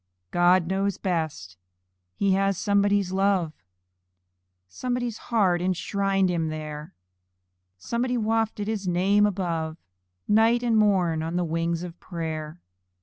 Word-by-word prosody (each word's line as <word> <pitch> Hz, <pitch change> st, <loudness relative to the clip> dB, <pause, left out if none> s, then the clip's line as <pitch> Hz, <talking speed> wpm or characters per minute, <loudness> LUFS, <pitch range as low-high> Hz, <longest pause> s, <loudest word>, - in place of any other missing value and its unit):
God 175 Hz, 0 st, +4 dB
knows 195 Hz, +2 st, -1 dB
best! 155 Hz, -, -3 dB, 0.6 s
He 200 Hz, -, +1 dB
has 195 Hz, 0 st, +2 dB
somebody's 200 Hz, -1 st, +2 dB
love; 190 Hz, -4 st, +1 dB, 1.1 s
Somebody's 245 Hz, -, -3 dB
heart 190 Hz, -7 st, +2 dB
enshrined 195 Hz, +1 st, 0 dB
him 170 Hz, -3 st, 0 dB
there 150 Hz, -1 st, -7 dB, 0.8 s
Somebody 240 Hz, -, -2 dB
wafted 220 Hz, -2 st, 0 dB
his 210 Hz, -3 st, -3 dB
name 195 Hz, +4 st, +3 dB
above, 165 Hz, -5 st, -2 dB, 0.5 s
Night 225 Hz, +3 st, +4 dB
and 235 Hz, -2 st, +2 dB
morn, 185 Hz, -7 st, +2 dB
on 165 Hz, +2 st, -3 dB
the 180 Hz, 0 st, +1 dB
wings 165 Hz, +1 st, -1 dB
of 175 Hz, -1 st, -8 dB
prayer. 160 Hz, -2 st, -5 dB
185 Hz, 115 wpm, -25 LUFS, 165-205 Hz, 1.1 s, God